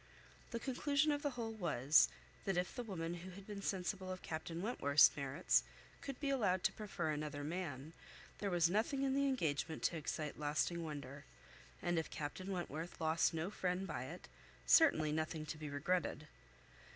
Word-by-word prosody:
The 235 - -3
conclusion 285 +4 +2
of 290 0 0
the 290 - 0
whole 225 -1 -2
was, 155 - +4 0.4
that 195 -2 0
if 180 +1 0
the 245 - -3
woman 175 -7 -3
who 175 +2 -7
had 190 +1 -10
been 205 -1 -6
sensible 190 0 -2
of 185 - -6
Captain 165 +2 -4
Wentworth's 145 - +6
merits 140 +4 +2 0.4
could 275 -2 -6
be 280 -2 0
allowed 200 -9 +2
to - - +3
prefer 195 -7 -3
another 150 -1 -3
man, 155 -2 -4 0.5
there 200 - -1
was 175 -2 +4
nothing 225 - +1
in 270 -1 +2
the 280 +1 +3
engagement 160 - -1
to 170 - +2
excite 150 -1 -3
lasting 155 +3 0
wonder; 145 -3 -6 0.6
and 175 -1 +2
if 160 - -4
Captain 155 +6 -5
Wentworth 175 -2 -4
lost 160 0 +3
no 165 +5 -2
friend 185 -1 -1
by - - -4
it, - - -8 0.4
certainly 155 - +6
nothing 155 0 -2
to 150 - -4
be 155 -1 -5
regretted. 150 +1 -1
175 Hz, 175 wpm, -38 LUFS, 155-205 Hz, 0.6 s, Wentworth's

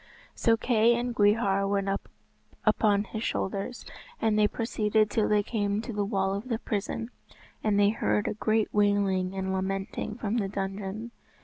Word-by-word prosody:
So 225 -1 +2
Kay 230 0 +3
and 240 +1 -2
Gwrhyr 205 -2 +3
went 200 -1 0 0.8
upon 210 -1 +3
his 215 +1 -6
shoulders, 200 +5 -3 0.3
and 220 -1 +2
they 210 0 +4
proceeded 215 -1 0
till 220 - +1
they 210 -1 +3
came 205 -2 -1
to 230 +1 -5
the 205 0 0
wall 195 -2 0
of 205 +6 -5
the 230 - 0
prison, 225 +2 -3 0.5
and 210 -2 +2
they 200 0 +5
heard 105 - 0
a - - 0
great 215 0 0
wailing 200 -2 +2
and 190 0 -2
lamenting 195 +2 -3
from 225 0 -2
the 205 -4 0
dungeon. 195 +3 -4
205 Hz, 165 wpm, -28 LUFS, 195-220 Hz, 0.8 s, they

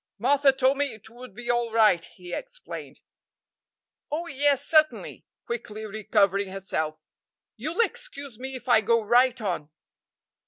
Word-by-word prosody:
"Martha 275 +5 +4
told 265 +1 +2
me 285 - +2
it 220 +1 -16
would 245 -3 -12
be 240 +1 -8
all 240 -1 0
right," 215 -7 +4
he 180 -1 -11
explained. - - -8 1.1
"Oh, 315 +4 -2
yes, 285 -2 +1
certainly," 310 -1 +2 0.2
quickly 220 -3 -5
recovering 200 -2 +1
herself, 160 -5 -3 0.5
"you'll 315 - -1
excuse 405 - -4
me 265 +1 -5
if 255 0 -9
I 235 -3 +6
go 230 +2 +3
right 245 +3 +4
on." 175 -8 -3
240 Hz, 135 wpm, -26 LUFS, 210-280 Hz, 1.1 s, I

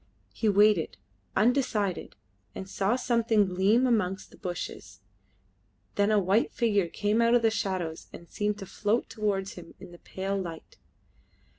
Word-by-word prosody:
He 220 - 0
waited, 205 -4 +3 0.4
undecided, 215 - +1 0.4
and 190 - -6
saw 195 +4 0
something 230 -4 +2
gleam 195 +7 +2
amongst 195 -6 0
the - - -16
bushes; 170 - -6 0.9
then 205 +1 +2
a 215 - +3
white 200 +3 +2
figure 205 -6 +1
came 210 +6 0
out 235 +1 +4
of 240 - +3
the 225 - +4
shadows 185 -6 -3
and 170 - -11
seemed 210 +2 -2
to 195 - -7
float 210 +5 -1
towards 200 -3 -1
him 175 -2 -12
in - - -11
the 175 - -13
pale 195 +1 -4
light. 165 -3 -9
205 Hz, 150 wpm, -28 LUFS, 185-220 Hz, 0.9 s, out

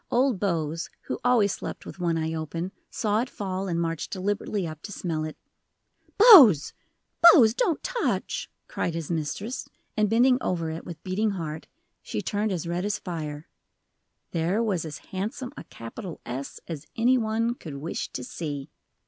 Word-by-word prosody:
Old 250 -4 +2
Bose, 165 -4 -1
who - - -4
always 235 -5 +4
slept - - -6
with - - -9
one 170 -2 +1
eye 160 0 -1
open, 165 +3 -3 0.2
saw 215 0 +1
it 250 - -3
fall, 190 -1 -3
and 170 -2 -1
marched 165 -2 -2
deliberately 200 0 -2
up 155 -2 -7
to 205 - -8
smell 165 -5 -2
it. 155 0 -6 0.8
"Bose 295 - +9 0.5
Bose 270 -10 +9
don't 340 - 0
touch!" - - -1 0.2
cried 180 - -2
his 165 -1 -4
mistress, 170 - -3 0.3
and 215 -2 +2
bending 250 +3 +4
over 165 -3 -1
it 160 - -6
with 170 -3 -8
beating 200 +4 0
heart, 155 -2 -5 0.3
she 105 - -4
turned 210 - -1
as 175 -3 -2
red 175 +1 -2
as 205 +1 0
fire. 155 -4 -5 0.8
There 175 +7 +1
was 190 -7 0
as 155 -2 -6 0.2
handsome 215 +6 -3
a - - -9
capital 160 - -8
S 130 +3 -5
as 160 -3 -6
any 250 +3 +4
one 225 +1 0
could 160 -11 -9
wish 150 +5 -4
to 125 - -4
see. 145 +1 -5
180 Hz, 165 wpm, -26 LUFS, 160-220 Hz, 0.8 s, Bose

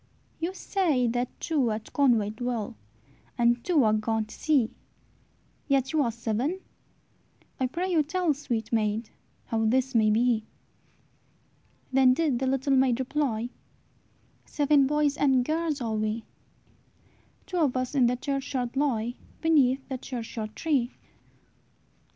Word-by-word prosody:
"You 345 +3 -3
say 330 -14 +1
that 245 +2 0
two 285 -7 +1
at 215 0 -5
Conway 235 -7 +3
dwell, 230 -1 -3 0.6
And 240 0 +2
two 325 -7 +3
are 215 -1 +3
gone 220 0 0
to 215 - -13
sea, 280 -8 +1 1.0
Yet 270 -1 +1
ye 315 - +2
are 240 -4 +1
seven! 235 - -2 1.0
I 260 - +1
pray 360 +8 -3
you 330 -3 +4
tell, 335 +1 0
Sweet 235 -6 -4
maid, 215 0 0 0.3
how 225 -1 -1
this 260 +4 +1
may 220 -2 +4
be." 225 +1 +2 1.5
Then 260 -1 +5
did 290 -6 +1
the 265 - -1
little 270 +1 +1
maid 260 -2 +3
reply, 255 -4 -1 0.9
"Seven 290 -2 +3
boys 295 0 +1
and 265 -3 +3
girls 315 -2 -1
are 225 -2 -2
we; 215 +1 -2 1.2
Two 365 - -4
of 285 -7 +2
us 255 +1 -2
in 260 -4 +4
the 245 - +1
churchyard 265 -2 -3
lie, 245 -5 0 0.3
Beneath 275 -5 +3
the 260 -2 -4
churchyard 225 -4 -6
tree." 270 -6 0
255 Hz, 135 wpm, -27 LUFS, 230-290 Hz, 1.5 s, Then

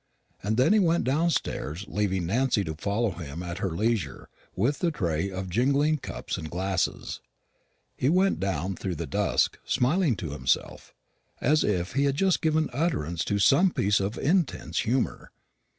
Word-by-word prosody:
And 110 +3 -1
then 130 +11 +4
he 215 - +5
went 170 -3 +2
downstairs, 130 - -1
leaving 95 -4 -1
Nancy 115 +3 +1
to 80 -3 -4
follow 100 +7 -1
him 85 -1 -7
at 90 +1 -5
her 95 - -1
leisure 100 - -2 0.3
with 125 +9 0
the 175 - +2
tray 90 - -1
of 95 0 -5
jingling 140 - +2
cups - - -5
and 80 - -6
glasses. 95 +2 -2 0.7
He 130 - +1
went 185 +4 +3
down 95 -1 -2
through 90 0 -4
the 80 +1 -4
dusk, 70 - 0
smiling 145 +1 +2
to 85 -7 -5
himself, 65 -3 -2 0.4
as 150 +4 +3
if 90 -3 -1
he 140 +1 +2
had 140 -1 +1
just 190 +3 +2
given 155 -2 +1
utterance 85 - -1
to 100 - 0
some 140 - +5
piece 105 - +1
of 100 +2 -2
intense 170 -1 0
humour. 125 +3 -1
105 Hz, 165 wpm, -27 LUFS, 90-145 Hz, 0.7 s, he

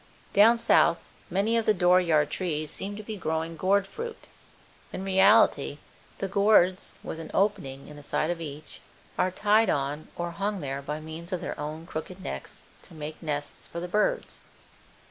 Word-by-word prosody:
Down 225 +4 +7
south 200 -7 +4 0.3
many 200 +6 +1
of 225 - -1
the 215 - +4
door 180 0 +5
yard 155 -4 +2
trees 155 -5 -2
seem 200 +1 -5
to 215 - -7
be 215 0 -6
growing 160 -1 -2
gourd 195 +3 +2
fruit. 460 - -7 0.7
In 190 - -5
reality 195 -6 +4 0.4
the 195 - -2
gourds 195 -2 +3
(with 160 - -6
an 160 - -7
opening 140 -10 0
in 150 - -11
the - - -10
side 155 +3 -1
of 170 -1 -4
each) 150 -1 -8 0.3
are 185 - +2
tied 210 +3 +3
on 145 +2 -1
or 175 0 -3
hung 200 +3 -2
there 140 -3 -4
by 150 +2 -4
means 160 +3 -9
of 185 - -1
their - - -5
own 155 +2 -5
crooked 175 +2 -6
necks 185 - -7 0.2
to 175 - -11
make 155 0 -7
nests 145 -3 -3
for 170 - -6
the 175 - -4
birds. 210 +4 0
175 Hz, 180 wpm, -27 LUFS, 155-200 Hz, 0.7 s, Down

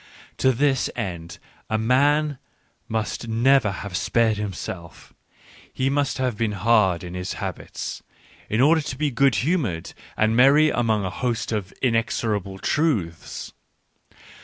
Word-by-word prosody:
To 130 - +3
this 135 +1 +1
end, 85 -7 -5 0.3
a 110 - +1
man 140 +5 +2 0.5
must 110 +1 -3
never 120 +1 +3
have 100 -1 -6
spared 110 +2 +2
himself, 95 -4 -7 0.6
he 130 +1 0
must 145 -1 0
have 125 -3 -1
been 110 0 -1
hard 100 -4 +2
in 90 0 -7
his 90 0 -4
habits, - - -6 0.5
in 110 +3 +1
order 160 +4 +5
to 145 -3 -6
be 150 0 0
good 135 0 +3
humoured 120 - -1 0.2
and 110 +1 +2
merry 145 +5 +6
among 110 -4 +1
a 95 - -3
host 120 -2 -2
of 105 -4 -3
inexorable 110 -5 0
truths. 105 - -1
115 Hz, 135 wpm, -23 LUFS, 100-135 Hz, 0.6 s, merry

